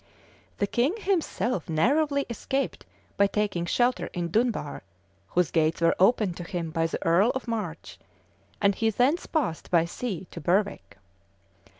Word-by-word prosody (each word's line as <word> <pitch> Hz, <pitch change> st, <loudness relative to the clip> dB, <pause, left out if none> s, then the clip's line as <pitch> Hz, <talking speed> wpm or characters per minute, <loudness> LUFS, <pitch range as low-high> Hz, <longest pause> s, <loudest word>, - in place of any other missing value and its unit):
The 205 Hz, -, +1 dB
king 245 Hz, -, +1 dB
himself 300 Hz, -, -1 dB
narrowly 280 Hz, -, +2 dB
escaped 265 Hz, +4 st, -3 dB, 0.3 s
by 200 Hz, -, +5 dB
taking 200 Hz, -5 st, -1 dB
shelter 245 Hz, +6 st, +1 dB
in 175 Hz, -1 st, -2 dB
Dunbar, 235 Hz, +3 st, 0 dB, 0.5 s
whose 180 Hz, -3 st, +1 dB
gates 160 Hz, -1 st, +2 dB
were 165 Hz, 0 st, +3 dB
opened 195 Hz, -2 st, +3 dB
to 175 Hz, -, -5 dB
him 170 Hz, -2 st, -4 dB
by 165 Hz, 0 st, +1 dB
the -, -, -5 dB
earl 175 Hz, +7 st, +4 dB
of 260 Hz, -, -4 dB
March; 210 Hz, -9 st, -5 dB, 0.6 s
and 200 Hz, -1 st, +3 dB
he 225 Hz, +3 st, +1 dB
thence 255 Hz, -, +1 dB
passed 275 Hz, -, -2 dB
by 170 Hz, -2 st, +4 dB
sea 190 Hz, +1 st, -4 dB
to -, -, -8 dB
Berwick. 175 Hz, -, 0 dB
200 Hz, 150 wpm, -27 LUFS, 170-245 Hz, 0.6 s, by